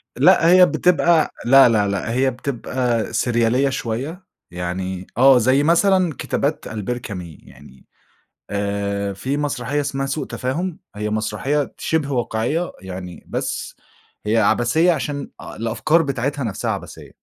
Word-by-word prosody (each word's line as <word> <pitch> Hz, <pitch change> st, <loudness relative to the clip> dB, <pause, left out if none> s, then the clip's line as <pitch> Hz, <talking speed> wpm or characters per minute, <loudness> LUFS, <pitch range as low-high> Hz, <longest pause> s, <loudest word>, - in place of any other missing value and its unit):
لأ، 165 Hz, -, +5 dB
هي 180 Hz, 0 st, +8 dB
بتبقى 170 Hz, -3 st, +2 dB
لأ، 135 Hz, 0 st, +7 dB
لأ، 105 Hz, -3 st, +2 dB
لأ، 100 Hz, +3 st, -2 dB
هي 130 Hz, +2 st, +2 dB
بتبقى 125 Hz, -2 st, -2 dB
سِريالية 120 Hz, +3 st, +2 dB
شوية 135 Hz, +10 st, -4 dB, 0.3 s
يعني 90 Hz, +1 st, -4 dB
آه، 130 Hz, +1 st, +7 dB
زي 130 Hz, +4 st, +3 dB
مثلًا 180 Hz, 0 st, +3 dB
كتابات 145 Hz, +1 st, -2 dB
ألبير 110 Hz, +3 st, -4 dB
كامي 90 Hz, -9 st, -8 dB
يعني 65 Hz, 0 st, -17 dB, 0.7 s
آآ 100 Hz, 0 st, -2 dB
في 130 Hz, +9 st, -3 dB
مسرحية 145 Hz, -1 st, -2 dB
اسمها 135 Hz, -1 st, -2 dB
سوء 140 Hz, 0 st, -3 dB
تفاهم 160 Hz, +7 st, -3 dB, 0.2 s
هي 105 Hz, 0 st, -3 dB
مسرحية 110 Hz, +7 st, -1 dB
ت -, -, -17 dB
شِبه 155 Hz, -3 st, -1 dB
واقعية 120 Hz, +7 st, -1 dB
يعني 90 Hz, -1 st, -8 dB
بس -, -, -4 dB, 0.5 s
هي 110 Hz, +2 st, +2 dB
عَبَثية 120 Hz, -, +3 dB
عشان 145 Hz, -2 st, -3 dB
أ -, -, -9 dB
الأفكار 115 Hz, +9 st, +1 dB
بتاعتها 140 Hz, 0 st, -2 dB
نَفْسها 105 Hz, -4 st, -2 dB
عَبَثية. -, -, -7 dB
125 Hz, 135 wpm, -21 LUFS, 105-145 Hz, 0.7 s, هي